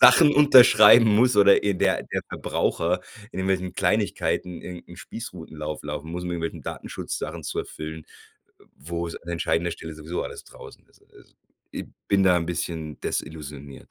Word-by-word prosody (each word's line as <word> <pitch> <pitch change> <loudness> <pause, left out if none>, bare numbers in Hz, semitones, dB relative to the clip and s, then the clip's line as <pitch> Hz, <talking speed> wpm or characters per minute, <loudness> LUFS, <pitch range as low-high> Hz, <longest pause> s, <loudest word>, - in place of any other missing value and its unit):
Sachen 150 -3 +8
unterschreiben 125 -5 +8
muss 115 +3 +4
oder 100 -1 +7
der 100 -3 +1
der - - -3
Verbraucher 90 +2 -1 0.3
in 95 - -4
irgendwelchen 95 -1 -1
Kleinigkeiten 100 -4 -1
irgend 90 -1 -9
'n 85 - -12
Spießrutenlauf 80 -8 -8
laufen 75 +2 -6
muss, 90 +1 -5
um 90 - -4
irgendwelchen 85 -1 -4
Datenschutzsachen - - -6
zu - - -4
erfüllen, 80 0 -8 0.6
äh, - - -21
wo 85 +4 -5
es 80 - -7
an 85 - -11
entscheidender 85 0 -1
Stelle 80 -1 -8
sowieso 80 +3 -5
alles - - -8
draußen - - -14
ist - - -28
also - - -20 0.4
Ich - - -6 0.2
bin 100 -1 +3
da 90 -2 +5
'n 85 - -2
bisschen 80 -3 -4
desillusioniert. 70 -3 -6
85 Hz, 160 wpm, -24 LUFS, 80-100 Hz, 0.6 s, Sachen